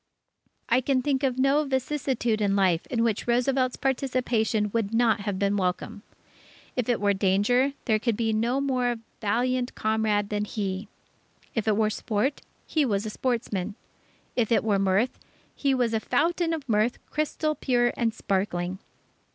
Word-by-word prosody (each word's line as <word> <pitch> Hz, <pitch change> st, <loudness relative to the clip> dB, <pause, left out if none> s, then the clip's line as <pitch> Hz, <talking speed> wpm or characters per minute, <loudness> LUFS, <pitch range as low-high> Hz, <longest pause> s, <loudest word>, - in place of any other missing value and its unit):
I 250 Hz, +2 st, +3 dB
can 260 Hz, 0 st, +1 dB
think 275 Hz, -1 st, +1 dB
of 260 Hz, -3 st, 0 dB
no 275 Hz, +3 st, +3 dB
vicissitude 265 Hz, -4 st, -1 dB
in 200 Hz, -1 st, +2 dB
life 185 Hz, -4 st, +2 dB
in 230 Hz, -2 st, 0 dB
which 225 Hz, -1 st, 0 dB
Roosevelt's 255 Hz, +1 st, +2 dB
participation 245 Hz, -5 st, 0 dB
would 225 Hz, -1 st, 0 dB
not 230 Hz, -1 st, +3 dB
have 200 Hz, -1 st, -3 dB
been 200 Hz, +1 st, +1 dB
welcome. 185 Hz, +2 st, -2 dB, 0.7 s
If 250 Hz, -2 st, -1 dB
it 240 Hz, -, +2 dB
were 205 Hz, 0 st, +2 dB
danger, 205 Hz, +8 st, +2 dB
there 220 Hz, -3 st, +2 dB
could 225 Hz, -1 st, 0 dB
be 225 Hz, -2 st, 0 dB
no 235 Hz, +5 st, +1 dB
more 250 Hz, -3 st, 0 dB, 0.2 s
valiant 245 Hz, +4 st, 0 dB
comrade 215 Hz, -2 st, +1 dB
than 210 Hz, 0 st, -1 dB
he. 200 Hz, -1 st, -3 dB, 0.7 s
If 225 Hz, -2 st, -2 dB
it 210 Hz, -1 st, +3 dB
were 215 Hz, -1 st, +2 dB
sport, 220 Hz, +6 st, -1 dB, 0.2 s
he 310 Hz, -, +1 dB
was 210 Hz, -5 st, 0 dB
a 215 Hz, -, -3 dB
sportsman. 215 Hz, -6 st, -2 dB, 0.6 s
If 235 Hz, -3 st, +1 dB
it 230 Hz, -, +3 dB
were 205 Hz, -3 st, +2 dB
mirth, 195 Hz, +5 st, +1 dB, 0.4 s
he 275 Hz, -2 st, +1 dB
was 240 Hz, -3 st, +1 dB
a 220 Hz, -, +2 dB
fountain 335 Hz, +7 st, +1 dB
of 315 Hz, -4 st, -4 dB
mirth, 220 Hz, +1 st, +2 dB
crystal 305 Hz, 0 st, 0 dB
pure 240 Hz, -4 st, +1 dB
and 230 Hz, -2 st, +1 dB
sparkling.... 190 Hz, -3 st, -2 dB
230 Hz, 160 wpm, -26 LUFS, 205-255 Hz, 0.7 s, I